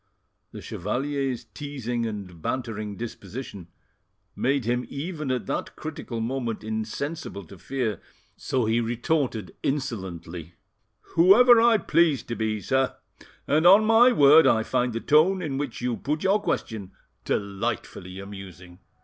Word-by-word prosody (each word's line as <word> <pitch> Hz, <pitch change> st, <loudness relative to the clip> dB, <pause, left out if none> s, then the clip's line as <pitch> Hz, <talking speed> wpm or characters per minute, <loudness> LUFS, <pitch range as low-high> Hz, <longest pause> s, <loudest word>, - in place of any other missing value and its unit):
The -, -, -9 dB
chevalier's 130 Hz, +5 st, -2 dB
teasing 120 Hz, -1 st, -4 dB
and 95 Hz, -6 st, -7 dB
bantering 110 Hz, -3 st, -3 dB
disposition 105 Hz, -4 st, -7 dB, 0.7 s
made 135 Hz, -1 st, 0 dB
him 120 Hz, +1 st, 0 dB
even 155 Hz, 0 st, -5 dB
at 125 Hz, -5 st, -1 dB
that -, -, -4 dB
critical 150 Hz, -6 st, -6 dB
moment 115 Hz, -1 st, -3 dB
insensible 110 Hz, +3 st, -4 dB
to 95 Hz, +2 st, -14 dB
fear, 120 Hz, -7 st, -3 dB, 0.3 s
so 125 Hz, -3 st, -1 dB
he 115 Hz, +2 st, +2 dB
retorted 120 Hz, 0 st, -1 dB
insolently— 90 Hz, -, -4 dB, 0.6 s
"Whoever 225 Hz, +8 st, +7 dB
I 230 Hz, -1 st, +5 dB
please 165 Hz, -, +2 dB
to 120 Hz, -, -5 dB
be, 110 Hz, -2 st, -2 dB
sir; 130 Hz, +2 st, 0 dB, 0.5 s
and 155 Hz, +4 st, +3 dB
on 200 Hz, +4 st, +7 dB
my 225 Hz, +3 st, +6 dB
word 150 Hz, -, +7 dB
I 110 Hz, -1 st, +3 dB
find 120 Hz, +2 st, 0 dB
the 115 Hz, -, -3 dB
tone 160 Hz, +9 st, +4 dB
in 145 Hz, -6 st, -3 dB
which 140 Hz, -5 st, -4 dB
you 120 Hz, -1 st, -1 dB
put 150 Hz, +2 st, -2 dB
your 200 Hz, +2 st, +3 dB
question 100 Hz, -, -3 dB, 0.3 s
delightfully 95 Hz, -2 st, -3 dB
amusing." 95 Hz, -3 st, -10 dB
120 Hz, 130 wpm, -25 LUFS, 105-145 Hz, 0.7 s, Whoever